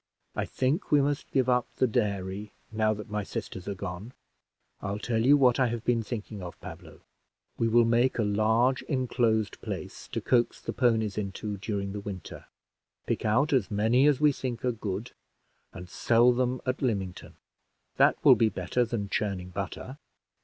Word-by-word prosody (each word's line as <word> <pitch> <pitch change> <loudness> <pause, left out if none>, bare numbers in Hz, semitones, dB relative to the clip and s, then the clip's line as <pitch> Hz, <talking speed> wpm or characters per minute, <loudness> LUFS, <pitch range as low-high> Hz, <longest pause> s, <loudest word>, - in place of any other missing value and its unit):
I - - -1
think 135 +9 -1
we 150 - +6
must 145 +1 -1
give 130 -2 +1
up 125 -1 +2
the - - +3
dairy, 100 -3 -2 0.2
now 110 0 +2
that 105 +1 -9
my 105 0 -1
sisters 95 -2 -6
are 100 - -3
gone. 95 +5 -6 0.7
I'll 100 0 -3
tell 110 +1 -1
you 140 +4 +6
what 125 -3 +4
I 130 - +4
have 115 -1 -4
been 120 -2 +2
thinking 105 -2 -6
of, 90 -1 -8
Pablo. - - -11 0.6
We 115 - +2
will 115 +1 +5
make 120 +3 +2
a 115 - +2
large 110 +5 +2
inclosed 120 -5 0
place, - - -6
to - - -3
coax 120 -2 +1
the - - -5
ponies 110 -5 +1
into 105 +1 -4
during 100 0 -3
the 105 - -5
winter, 100 -3 -8 0.6
pick - - -2
out 130 +8 +2
as 125 -8 +2
many 115 +6 +3
as 145 -3 +3
we 150 -1 +5
think 130 -3 -4
are 125 - +2
good, 110 0 -5 0.6
and 90 +1 -9
sell 120 +6 +4
them 125 0 0
at 130 0 -2
Lymington. 100 -8 -3 0.6
That - - +5
will - - +10
be 115 - +3
better 95 +5 0
than 115 -3 -3
churning 100 -3 -2
butter." 100 +8 -6
115 Hz, 175 wpm, -28 LUFS, 100-125 Hz, 0.7 s, will